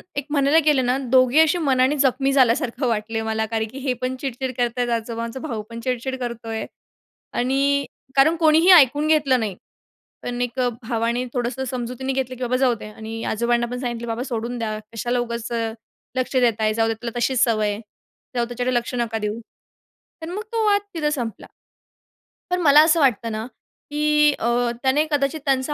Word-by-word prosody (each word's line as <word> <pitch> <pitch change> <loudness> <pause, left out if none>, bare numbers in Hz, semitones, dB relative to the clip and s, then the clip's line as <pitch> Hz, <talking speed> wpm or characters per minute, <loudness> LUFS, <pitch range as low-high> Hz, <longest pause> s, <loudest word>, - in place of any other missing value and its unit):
एक 285 -1 -2
म्हणायला 285 +1 +3
गेलं 285 -4 +3
ना, 250 +1 +1
दोघेही 255 +3 +5
अशी 320 +2 +3
मनाने 270 -3 +2
जखमी 270 0 +2
झाल्यासारखं 255 0 +2
वाटलं 225 0 -1
मला, 220 0 -1
कारण 220 0 -2
की 260 - -10
हे 260 -2 -1
पण 255 +1 -1
चिडचिड 260 -1 -3
करत 240 -1 +1
आहेत, 245 -1 0
आजोबांचा 230 +1 -3
भाऊ 240 -7 -4
पण 230 0 -7
चिडचिड 255 +2 -2
करतोय 230 -2 -4 0.7
आणि 275 +2 +1 0.3
कारण 310 +5 +5
कोणीही 320 +2 +5
ऐकून 295 -2 +6
घेतलं 285 -5 +3
नाही. 205 -5 -3 0.7
पण 245 0 -4
एक 245 +1 -4 0.2
भावाने 235 +1 -1
थोडंसं 245 +1 -2
समजुतीने 255 +1 -3
घेतलं, 255 -1 -2
की 255 - -9
"बाबा, 250 +1 +1
जाऊ 255 -2 +3
दे" 215 - -10
आणि 220 +1 -7
आजोबांना 235 +2 +1
पण 250 - -4
सांगितलं, 240 -2 -4
"बाबा, 230 +1 -2
सोडून 240 -1 -4
द्या, 215 -2 -3
कशाला 240 +2 -1
उगाच 235 -1 -4 0.7
लक्ष 255 +1 -1
देत 235 -3 +2
आहे, 215 0 +1
जाऊ 225 0 +1
दे 225 - 0
त्याला, 235 +1 -6
तशीच 255 +1 +1
सवय 215 -3 +1
आहे, 205 +1 -4 0.6
जाऊ 240 - +2
त्याकडे 245 +1 -2
लक्ष 240 +1 -1
नका 235 -2 -1
देऊ." 210 +1 -3 0.8
तर 320 - -5
मग 410 +4 -4
तो 450 -1 +1
वाद 405 -1 +4
तिथे 305 -3 0
संपला. 240 -8 -4 1.0
पण 360 0 0
मला 295 -1 +7
असं 330 +1 +3
वाटतं 235 -5 +2
ना 215 +1 -4 0.5
की 300 0 +3
अ, - - -1 0.4
त्याने 275 +4 +3
कदाचित 290 +2 0
त्यांचं 270 +1 +1
250 Hz, 180 wpm, -22 LUFS, 230-275 Hz, 1.0 s, मला